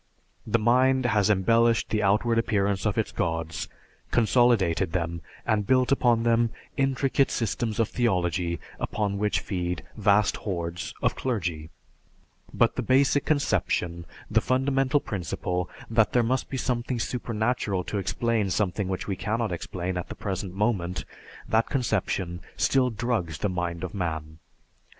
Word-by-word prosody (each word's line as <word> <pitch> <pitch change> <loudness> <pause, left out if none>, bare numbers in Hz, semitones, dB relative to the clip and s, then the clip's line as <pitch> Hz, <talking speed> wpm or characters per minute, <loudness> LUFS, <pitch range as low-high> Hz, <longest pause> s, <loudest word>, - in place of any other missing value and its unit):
The - - +3
mind 130 +3 +3
has 105 -3 +3
embellished 115 +4 +3
the 105 -1 +1
outward 110 +4 +2
appearance 100 -2 +1
of 105 - -1
its 110 - 0
gods, 80 -1 -2 0.4
consolidated 105 -8 +3
them, 85 -2 -2 0.2
and 105 -2 +1
built 130 0 +3
upon 120 -4 +3
them 115 0 +3 0.3
intricate 135 0 +2
systems 115 -1 -2
of 115 - +3
theology, 90 -7 0 0.2
upon 100 -2 -2
which 105 0 +1
feed 90 -3 -3
vast 105 -1 +3
hordes 85 -3 -4
of - - +2
clergy; 85 -11 -2 0.8
but - - +2
the - - +1
basic 135 +2 +3
conception, 85 - 0 0.2
the - - +2
fundamental 135 +2 +2
principle, 90 - -3 0.2
that 110 -1 +2
there 120 - +4
must 130 +3 0
be 135 - -3
something 125 0 -1
supernatural 110 -4 -1
to 100 - -3
explain 100 +2 0
something 95 +1 0
which 95 -1 -3
we 100 - -1
cannot 110 +1 -1
explain 90 +1 -3
at 90 - -4
the - - -6
present 95 -1 -4
moment, 100 -4 -1 0.4
that 110 +1 +2
conception 95 -8 -1 0.2
still 130 -2 +3
drugs 110 -9 -2
the 105 - -1
mind 85 -1 -3
of 90 - -4
man. 80 -4 -4
105 Hz, 140 wpm, -26 LUFS, 90-120 Hz, 0.8 s, there